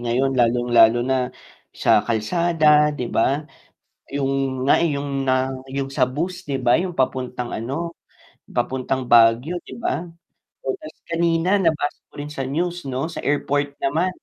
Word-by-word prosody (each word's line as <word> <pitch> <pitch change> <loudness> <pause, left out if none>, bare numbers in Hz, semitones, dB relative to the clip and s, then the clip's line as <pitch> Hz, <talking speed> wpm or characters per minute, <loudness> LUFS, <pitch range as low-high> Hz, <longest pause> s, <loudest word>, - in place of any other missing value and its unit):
ngayon 125 +3 0
lalong 120 -1 +2
lalo 115 0 +6
na 130 +1 +1 0.6
sa - - +4
kalsada 150 +6 +3
'di 125 - -3
ba? 140 +6 +1 0.7
Yung 135 -2 -1
nga, - - +6
eh, 165 - +2
yung 140 -1 -3
na 130 0 +2 0.2
yung 135 0 -2
sa 135 -1 0
bus 165 +8 -2
'di 140 -2 -3
ba, 125 -1 +4
yung 180 +1 -1
papuntang 125 -1 -1
ano, 140 +9 -4 0.6
papuntang 130 0 -2
Baguio 120 +6 +5
'di - - -10
ba 165 -8 -1 0.6
oo - - 0
ta's 310 - -10 0.2
kanina 170 +3 +2
nabasa 160 -4 0
ko - - -41
rin 145 +1 -6
sa 135 - -4
news 175 +2 -2
'no, 130 +2 -2
sa 165 - -6
airport 145 0 0
naman. 160 +7 +1
135 Hz, 155 wpm, -22 LUFS, 130-160 Hz, 0.7 s, lalo